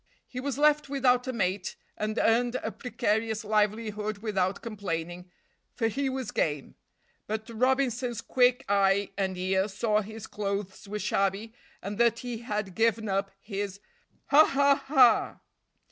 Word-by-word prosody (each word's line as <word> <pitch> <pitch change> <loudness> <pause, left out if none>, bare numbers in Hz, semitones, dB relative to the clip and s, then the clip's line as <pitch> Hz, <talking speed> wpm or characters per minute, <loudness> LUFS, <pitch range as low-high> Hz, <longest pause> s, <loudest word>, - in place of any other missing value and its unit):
He 250 - -6
was 275 0 -3
left 300 -1 +3
without 255 -2 +2
a - - 0
mate 190 -5 -2 0.2
and 215 +1 -3
earned 240 +2 +2
a - - -2
precarious 220 -1 -1
livelihood 210 0 0
without 200 -3 -1
complaining, 180 -5 -5 0.5
for 225 -2 +1
he 275 +4 -1
was 260 -4 -4
game; 145 -3 -1 0.5
but 220 +1 -3
Robinson's 250 -1 0
quick 250 +2 +2
eye 200 0 +2
and 190 -2 -2
ear 190 +2 +1
saw 210 +1 0
his 220 +1 -8
clothes 200 -1 -4
were 210 +1 -4
shabby 200 +2 -1 0.3
and 200 +2 -5
that 235 -1 +4
he 240 -2 -4
had 210 -5 -3
given 225 +1 +1
up 195 0 0
his 200 -1 -5 0.5
ha! 305 +2 +7 0.4
ha! 260 -5 +4
215 Hz, 140 wpm, -28 LUFS, 200-245 Hz, 0.5 s, ha